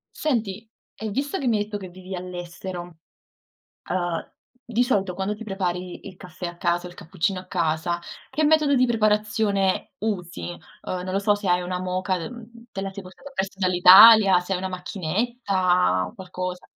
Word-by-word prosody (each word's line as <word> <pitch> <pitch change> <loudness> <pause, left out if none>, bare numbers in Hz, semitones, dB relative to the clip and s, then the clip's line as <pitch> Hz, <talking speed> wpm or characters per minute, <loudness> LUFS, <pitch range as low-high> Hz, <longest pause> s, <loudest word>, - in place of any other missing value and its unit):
Senti, 225 -7 -2 0.3
e 220 - -5
visto 280 - -2
che 270 - -3
mi 225 -3 +3
hai 205 - 0
detto 210 -1 -5
che 190 - -8
vivi 185 +1 -9
all'estero, 175 -1 -7 0.9
ehm, 175 -2 -2 0.3
di 240 +1 +1
solito, 195 -7 0
quando 195 +2 -2
ti 225 - -9
prepari 185 -3 -4
il 190 - -10
caffè 180 -1 -9
a 175 - -5
casa 175 +1 0
o - - -7
il 175 - -15
cappuccino 185 +3 -2
a 185 - -11
casa, 170 0 -1 0.3
che 300 +4 -1
metodo 300 -2 +4
di 255 -1 +4
preparazione 215 -3 +1
usi? 180 -5 -3
Ehm, - - -9 0.3
non 185 0 -4
lo 195 - +2
so, 205 +1 +3
se 205 -3 -3
hai 180 0 +3
una 180 0 -3
moka, 185 +1 -1
uhm 230 +5 -9
te 195 - -6
la 195 - -4
sei 195 +1 -8
portata 185 +9 -12
appresso 195 -6 -4
dall'Italia, 190 +2 +8
se 180 +2 -3
hai 180 - -1
una 190 - -3
macchinetta, 185 - 0
qualcosa. 185 -1 -6
190 Hz, 180 wpm, -24 LUFS, 180-215 Hz, 0.9 s, dall'Italia